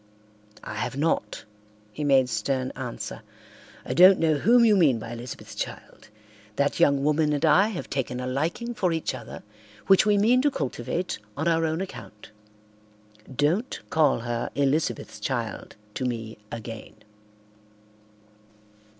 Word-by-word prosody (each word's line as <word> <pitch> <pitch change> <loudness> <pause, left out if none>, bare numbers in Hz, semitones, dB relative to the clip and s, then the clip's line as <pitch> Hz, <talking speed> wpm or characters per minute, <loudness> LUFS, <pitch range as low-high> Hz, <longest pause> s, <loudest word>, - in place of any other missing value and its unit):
"I - - -6
have 130 - -3
not," 140 -9 -1 0.5
he 150 - -4
made 135 -3 +4
stern 130 +2 -1
answer. - - -6 0.6
"I - - -3
don't 185 +2 +8
know 160 -1 +2
whom 235 +9 +5
you 215 -2 +5
mean 155 -10 +4
by 115 +1 -7
Elizabeth's 120 +1 -8
child. - - -7 0.5
That 140 +3 0
young 140 -1 +4
woman 150 +1 +2
and 145 +2 0
I 180 +6 +5
have 210 -6 -5
taken 125 -2 -3
a 125 - -4
liking 160 - -2
for 185 -6 0
each 160 -1 -2
other - - -9 0.4
which 195 -1 +6
we 210 -1 +3
mean 235 +5 +4
to 290 - +3
cultivate 135 - -3 0.2
on 160 +3 -1
our 165 -1 +2
own 160 +3 -2
account. 105 - -9 1.0
Don't 165 - 0
call 150 -6 +3
her 120 0 -3
Elizabeth's 145 +3 -1
child - - -4 0.2
to 130 - -4
me 115 -3 -4
again." 115 -1 -8
145 Hz, 140 wpm, -25 LUFS, 125-180 Hz, 1.0 s, don't